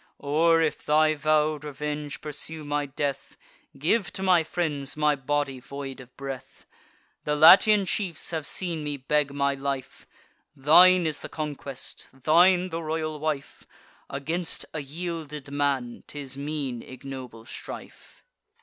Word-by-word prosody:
Or, 165 +3 +3
if 155 - -1
thy 155 +1 +4
vow'd 155 0 +1
revenge 150 0 -5
pursue 155 +1 -4
my 145 0 -1
death, 140 0 -4 0.4
Give 225 -5 +1
to 190 - -4
my 180 -3 +5
friends 150 -5 -2
my 150 -1 +3
body 140 -1 -1
void 135 +1 -7
of 125 -1 -14
breath! 135 -2 -8 0.6
The 150 - 0
Latian 195 +6 +8
chiefs 180 -3 -2
have 160 -3 -2
seen 170 -4 -1
me 145 -1 -3
beg 140 +1 +1
my 140 0 +1
life; 135 -1 -5 0.5
Thine 175 +6 +7
is 155 -2 -1
the - - -8
conquest, 145 -3 -5
thine 175 +7 +4
the 165 -1 -4
royal 155 -1 -3
wife: 150 -2 -4 0.4
Against 160 +5 -3
a 155 - -3
yielded 150 -1 -6
man, 140 -4 -1
'tis 140 -2 -5
mean 140 -4 -4
ignoble 130 -3 -9
strife." - - -10
150 Hz, 135 wpm, -26 LUFS, 140-160 Hz, 0.6 s, Latian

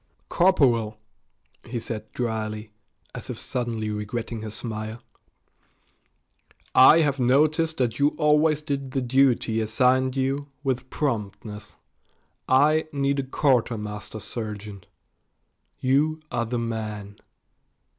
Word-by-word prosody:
"Corporal," 125 - +3 0.7
he 120 - -5
said 110 -2 -5
dryly, 110 -2 -3 0.4
as - - -7
if - - -4
suddenly 115 -3 -3
regretting 110 +2 -4
his 110 -1 -5
smile, 110 0 -5 1.7
"I 150 +6 +8
have 145 -3 +1
noticed 155 +6 +3
that 120 -1 0
you 145 +1 +3
always 150 0 +3
did 140 -3 -3
the 135 - 0
duty 125 -3 +2
assigned 130 +4 +2
you 135 +2 -1 0.2
with 130 -2 -2
promptness. 105 -5 -4 0.7
I 150 +4 +4
need 140 0 0
a - - +2
quartermaster 115 -6 -1
sergeant. 105 -4 -6 0.9
You 145 +5 +2
are 120 - -1
the 120 +1 -2
man." 110 -3 -4
125 Hz, 105 wpm, -25 LUFS, 110-140 Hz, 1.7 s, I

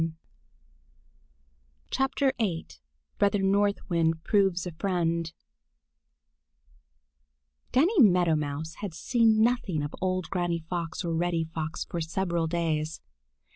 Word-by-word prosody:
VIII 260 -9 0 0.5
BROTHER 200 -1 +2
NORTH 200 +1 +1
WIND 165 -2 +1
PROVES 195 -4 +2
A 180 - -4
FRIEND 170 -2 -1 2.4
DANNY 345 - +3
MEADOW 180 - +5
MOUSE 150 +2 -3
had 195 -6 -5
seen 220 +3 +3
nothing 220 -10 +1
of 145 - -5
old 185 -1 -1
Granny 175 -3 -1
Fox 175 0 -3
or 170 - -1
Reddy 170 0 0
Fox 160 0 -4
for 170 - -4
several 170 0 -1
days. 160 -1 -1
175 Hz, 100 wpm, -28 LUFS, 165-200 Hz, 2.4 s, MEADOW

